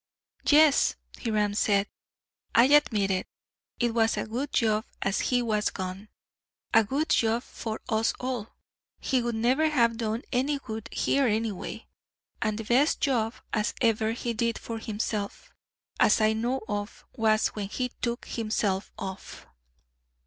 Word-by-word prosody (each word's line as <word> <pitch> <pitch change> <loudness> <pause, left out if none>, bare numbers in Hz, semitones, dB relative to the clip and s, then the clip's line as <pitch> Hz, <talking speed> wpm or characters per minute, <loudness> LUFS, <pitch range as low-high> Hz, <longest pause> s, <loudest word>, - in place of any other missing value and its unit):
"Yes," 295 -1 +5 0.3
Hiram 210 -3 +1
said, 205 -1 +2 0.7
"I 235 - +8
admit 250 -8 +4
it; 185 - -1 0.5
it 240 -2 +1
was 225 -1 +2
a - - -1
good 250 +6 -3
job 220 -2 +2 0.2
as 195 0 0
he 245 -1 +2
was 215 -2 +1
gone 190 +2 -6 0.6
a 225 - +7
good 275 +9 -1
job 230 +1 +2
for 220 -1 -6
us 220 0 +1
all. 250 -4 -3 0.5
He 260 -2 +1
would 240 -1 -2
never 255 +8 +2
have 235 -6 +2
done 225 +1 -2
any 275 +4 +1
good 225 -4 -7
here, 275 -2 +2
anyway; 220 -3 -2 0.6
and 215 -1 0
the 225 - -4
best 255 +7 +3
job 235 -5 +1 0.2
as 215 0 0
ever 225 -3 +2
he 235 0 -3
did 230 0 0
for 230 -1 -6
himself, 210 -1 -4 0.5
as 210 - +5
I 215 0 +3
know 240 +4 -1
of, 205 +1 -4
was 220 -1 +3
when 205 -2 -5
he 250 +3 -2
took 235 0 -2
himself 210 -3 -1
off." 190 0 -7
225 Hz, 150 wpm, -27 LUFS, 215-245 Hz, 0.7 s, I